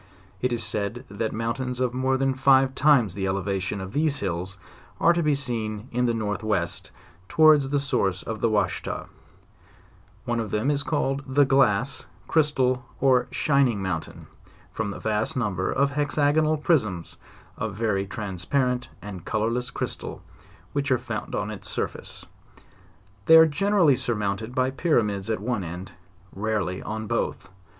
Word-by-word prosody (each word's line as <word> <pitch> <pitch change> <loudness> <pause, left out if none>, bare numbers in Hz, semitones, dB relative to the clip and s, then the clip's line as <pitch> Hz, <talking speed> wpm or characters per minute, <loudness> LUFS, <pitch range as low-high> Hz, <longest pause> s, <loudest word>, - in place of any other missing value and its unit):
It 125 - +1
is 120 - -1
said 110 +3 -2
that 110 +2 -2
mountains 125 +3 -3
of 125 -1 0
more 130 +1 +1
than 135 0 +1
five 135 0 +4
times 135 - +4
the 95 0 -2
elevation 95 0 -2
of 95 +1 -7
these 150 -1 +1
hills 95 0 -3 0.4
are 170 - +5
to 170 - 0
be 150 -3 +2
seen 115 -4 -3
in 125 +1 +1
the 120 - +2
northwest, 105 -4 -2 0.4
towards 155 -3 +5
the 145 - +1
source 125 -10 0
of 110 -1 -5
the 115 - +3
Washita, 105 -1 -1 1.2
one 120 0 0
of 110 -2 -3
them 110 +8 +1
is 145 -1 0
called 140 -2 -1
the 140 +2 +4
glass, 135 -2 +2 0.2
crystal, 130 -5 +2 0.2
or 130 -2 +3
shining 135 -6 +2
mountain, 90 -4 -4 0.5
from 110 -2 -3
the 100 - -5
vast 110 +3 -1
number 100 -6 -1
of 140 +1 +2
hexagonal 150 +2 +2
prisms 110 - 0 0.4
of 110 -3 -4
very 100 -3 0
transpa 100 +6 -1
rent 125 -1 -2 0.2
and 95 -4 -7
colorless 115 +5 -1
crystal - - -5 0.5
which 140 -1 -1
are 130 - +5
found 115 -4 -5
on - - -2
its - - -7
surface; - - -5 1.0
they 160 - +9
are 160 - +9
generally 175 -1 +3
surmounted 110 0 -2
by 130 0 +2
pyramids 110 - 0
at 110 - 0
one 110 -1 -2
end. 90 +3 -7 0.4
rarely 100 -3 -2
on 110 +1 -4
both. 100 - -2
120 Hz, 155 wpm, -25 LUFS, 105-135 Hz, 1.2 s, they